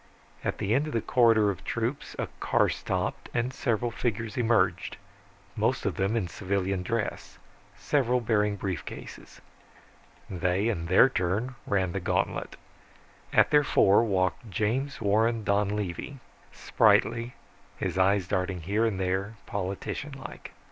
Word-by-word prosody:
At - - -2
the 100 - 0
end 140 +5 +2
of 155 - -5
the 115 - +1
corridor 115 -4 +4
of 95 - -9
troops - - -3
a - - -1
car - - +2
stopped - - -3
and 120 +2 0
several 120 -2 -1
figures 115 -2 -3
emerged, 105 -8 +1 0.6
most 115 +4 0
of 100 - +1
them 95 +4 0
in 105 -6 0
civilian 95 0 -2
dress, 110 +4 -3 0.4
several 125 -3 +1
bearing 105 -3 +1
brief 95 -5 -3
cases. - - -10 0.9
They 90 +4 0
in 85 -7 -2
their 95 +8 +6
turn 110 +2 -1
ran 95 -3 +1
the 95 - -2
gantlet. - - -1 0.8
At - - +4
their 150 -1 +5
fore 100 -5 +4
walked 95 +1 0
James 120 +8 -1
Warren 110 +2 +2
Donlevy, 100 - -1 0.3
spritely, 115 +2 +2 0.4
his - - -2
eyes 95 -1 +3
darting 90 0 -1
here, 105 +6 +1
there, 95 +2 -2
politician 100 +8 -4
like. 135 - -9
105 Hz, 135 wpm, -28 LUFS, 95-115 Hz, 0.9 s, their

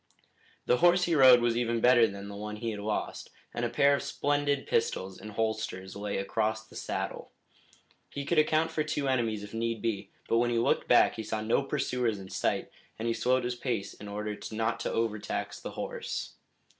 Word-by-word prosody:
The 125 - +3
horse 175 +4 +5
he 175 - +1
rode 130 -5 +8
was 120 -1 +2
even 115 -1 0
better 120 -1 +6
than 100 -1 -7
the 100 - -7
one 105 +1 -5
he 115 +1 -3
had 105 - -5
lost, 105 +1 -3 0.2
and 120 - -3
a 120 - +1
pair 140 +4 +4
of 140 - +1
splendid 145 -1 0
pistols 95 -4 -1
in 110 - -8
holsters 110 -3 -3
lay 100 0 -3
across 110 +2 -1
the - - -17
saddle. - - -4 0.8
He 140 0 -5
could 170 +2 +3
account 155 +1 +2
for 155 - 0
two 150 -2 -2
enemies 115 -5 0
if 105 - -10
need 115 0 -1
be, 110 -3 -2 0.2
but 115 - +3
when 120 0 +2
he 120 - +1
looked 115 - +1
back - - +5
he 110 - -3
saw 110 0 -3
no 110 +4 +2
pursuers 125 -5 -1
in 95 -1 -10
sight, - - -1 0.3
and 115 - -3
he 115 - +2
slowed 125 +3 +1
his 120 0 -1
pace 120 -5 -3
in 105 - -10
order 105 +1 -4 0.2
not 110 +1 -1
to - - -2
overtax 105 -2 -2
the - - -7
horse. - - -4
115 Hz, 205 wpm, -29 LUFS, 105-125 Hz, 0.8 s, rode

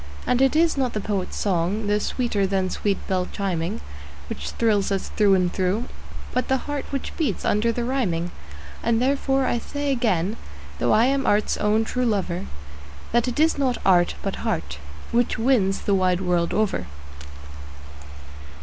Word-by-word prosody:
And 250 - +2
it 270 +2 +3
is 325 -1 +3
not 260 -3 0
the 215 - -1
poet's 195 -2 -3
song, 195 +2 0
though 205 0 +2
sweeter 210 -4 0
than 190 -1 0
sweet 200 -2 0
bells 185 -2 0
chiming, 170 - -2 0.5
Which 70 +1 -5
thrills 205 -4 +1
us 195 -1 -1
through 205 -2 +4
and 180 -1 +1
through, 190 +4 0 0.5
but 255 - 0
the 265 - +2
heart 290 -2 -3
which 275 -2 -4
beats 285 - -1
under 215 +3 +2
the 240 +1 -2
rhyming. 190 -10 -1 0.5
And 230 -1 +2
therefore 270 +1 +1
I 240 - +1
say 285 +3 -3
again, 215 -5 0 0.4
though 120 - +2
I 225 +2 +5
am 270 +1 +1
art's 210 +1 +2
own 215 +2 +2
true 250 +2 0
lover, 190 -4 -1 0.6
That 240 +1 +2
it 250 +3 -2
is 315 -1 +3
not 255 -3 +1
art, 175 -2 +4
but 195 - -2
heart, 170 - -3 0.3
which 240 0 +1
wins 225 -5 +2
the 200 - 0
wide 185 -1 +2
world 175 -2 +1
over. 200 - 0
210 Hz, 165 wpm, -24 LUFS, 185-250 Hz, 0.6 s, I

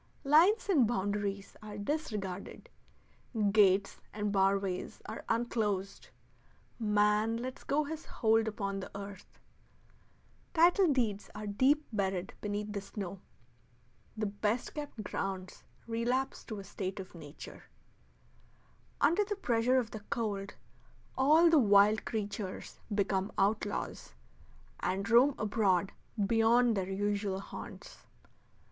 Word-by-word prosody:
Lines 340 +11 +5
and 295 - +4
boundaries 200 -2 -2
are 210 -1 -8
disregarded; 205 - -4 0.8
gates 200 -1 +4
and 210 -1 -2
bar 195 0 +3
ways 190 -2 -4
are 220 - -6
unclosed; 210 -4 -1 0.7
man 210 +1 +2
lets 255 +2 -6
go 300 +2 +1
his 315 +2 -6
hold 225 -1 +2
upon 200 -2 -3
the 190 - -7
earth; 200 -1 -10 1.2
title 350 +1 +5
deeds 220 -7 0
are 210 0 -5
deep 260 +9 +2
buried 190 -3 -1
beneath 210 0 -3
the 200 - -3
snow; 195 -2 -6 1.0
the 215 - -1
best 210 +3 -1
kept 290 -7 -6
grounds 190 -1 -4 0.2
relapse 240 +3 -1
to 215 - -6
a 200 - -7
state 190 0 -5
of 190 -1 -8
nature; 155 -3 -11 1.4
under 340 +8 +4
the 415 0 -3
pressure 250 -8 +2
of 240 -3 0
the 220 - -6
cold 205 -4 -2 0.6
all 310 +6 +5
the 325 -2 +6
wild 205 -1 +5
creatures 205 -3 -4 0.2
become 195 0 0
outlaws, 205 +1 -1 0.6
and 195 +2 -1
roam 260 +4 +6
abroad 200 -3 +1 0.3
beyond 230 +2 +4
their 190 -1 -2
usual 200 0 -1
haunts. 195 - -10
210 Hz, 115 wpm, -32 LUFS, 195-240 Hz, 1.4 s, the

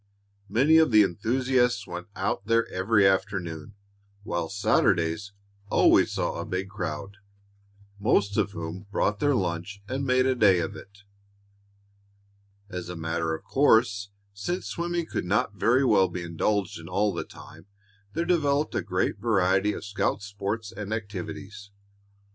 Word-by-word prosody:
Many 140 +10 +4
of 160 - +4
the 110 -2 +6
enthusiasts 120 +3 +1
went 90 0 -7
out 95 0 -2
there 115 0 +3
every 100 +2 +2
afternoon, 95 -2 -2 0.5
while 85 -5 -2
Saturdays 95 -1 +1 0.4
always - - +4
saw - - -2
a - - -4
big 95 +1 -3
crowd, 100 0 -5 0.8
most 100 -2 +2
of 100 - 0
whom 90 +2 -6
brought 105 0 0
their 145 -1 +2
lunch 95 +1 -3
and 130 +4 -3
made 130 -1 +3
a 130 - +3
day 105 -7 +5
of 85 -2 -2
it. 100 +1 -14 1.6
As 90 -3 -6
a 90 - -5
matter 80 0 -2
of - - -11
course, 110 -7 +3 0.2
since 175 - -3
swimming 170 0 -2
could - - -4
not 100 +2 +1
very 120 +6 +2
well 100 -6 +4
be 90 0 -5
indulged 90 +3 -1
in 85 +1 -10
all 100 +2 +1
the 85 - -3
time, 80 +4 -14 0.5
there 170 +3 -1
developed 150 -4 +1
a - - 0
great 95 +1 -1
variety 100 -2 +2
of 105 - -6
scout 100 0 -1
sports 100 +2 -4
and 105 0 -7
activities. 100 -1 -6
100 Hz, 150 wpm, -26 LUFS, 90-115 Hz, 1.6 s, the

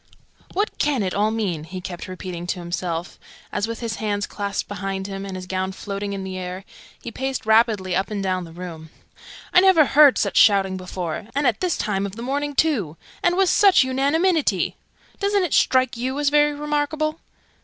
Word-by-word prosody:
"What 410 +3 -1
can 280 -7 +1
it 185 - -2
all 210 +2 +2
mean?" 200 -8 -2
he 185 +3 -7
kept 180 -1 -7
repeating 180 -1 -6
to 180 - -2
himself, 175 0 -4 0.3
as, 205 +1 -1
with 230 0 -6
his 225 -1 -3
hands 205 -1 -1
clasped 200 -1 -4
behind 195 -1 -4
him, 195 0 -5
and 190 - -6
his 185 0 -6
gown 190 +1 -2
floating 200 +1 -5
in 195 -1 -4
the 190 -1 -5
air, 185 +1 -6 0.3
he 235 - -7
paced 265 +2 -3
rapidly 220 -5 +3
up 190 +2 0
and 205 -2 -3
down 185 -1 -1
the 165 - -10
room. 165 -2 -8 0.6
"I 360 - +7
never 370 -5 +6
heard 285 0 +6
such - - 0
shouting 195 -2 +5
before 180 -1 -5
and 285 +1 +1
at 240 -4 +2
this 365 -2 0
time 200 -1 -1
of 195 - -10
the 230 - -7
morning, 285 +3 -2
too! 220 - +1 0.2
And 350 +1 +2
with 385 -2 +4
such 395 -8 +6
unanimity! 280 - +1 0.4
Doesn't 400 -1 +2
it 345 - -2
strike 255 -1 +3
you 255 +3 -3
as 290 -1 +2
very 295 0 +3
remarkable?" 300 +1 -1
210 Hz, 195 wpm, -22 LUFS, 185-285 Hz, 0.6 s, I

